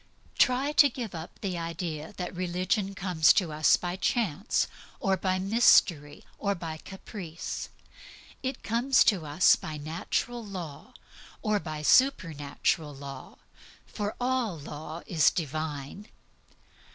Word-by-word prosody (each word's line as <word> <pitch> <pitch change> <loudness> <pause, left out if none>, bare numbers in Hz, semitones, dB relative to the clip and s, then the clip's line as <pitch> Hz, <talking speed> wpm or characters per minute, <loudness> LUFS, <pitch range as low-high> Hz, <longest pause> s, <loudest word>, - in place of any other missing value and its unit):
Try 260 +3 +3
to 290 -1 +6
give 235 -4 -6
up 165 0 -8
the 185 -4 -2
idea 165 -2 -4
that 180 -1 -4
religion 185 +3 -1
comes 180 -5 +4
to 180 -6 +1
us 155 +1 +4
by 175 +1 -4
chance, 205 - 0 0.3
or 195 -4 +2
by 185 0 0
mystery, 185 -7 +3 0.2
or 200 -1 0
by 165 -3 -6
caprice. 185 -2 -7 0.7
It 260 -1 -4
comes 245 +4 +3
to 180 -8 +2
us 150 +5 +5
by 155 -1 -6
natural 170 +10 -3
law, 175 -8 -8 0.5
or 215 -2 +2
by 155 -4 -6
supernatural 155 - +2
law, 135 -1 -9 0.5
for 205 0 -4
all 245 -7 0
law 155 +3 -8
is 170 -8 +4
Divine. 155 +2 -4
180 Hz, 125 wpm, -28 LUFS, 155-210 Hz, 0.7 s, to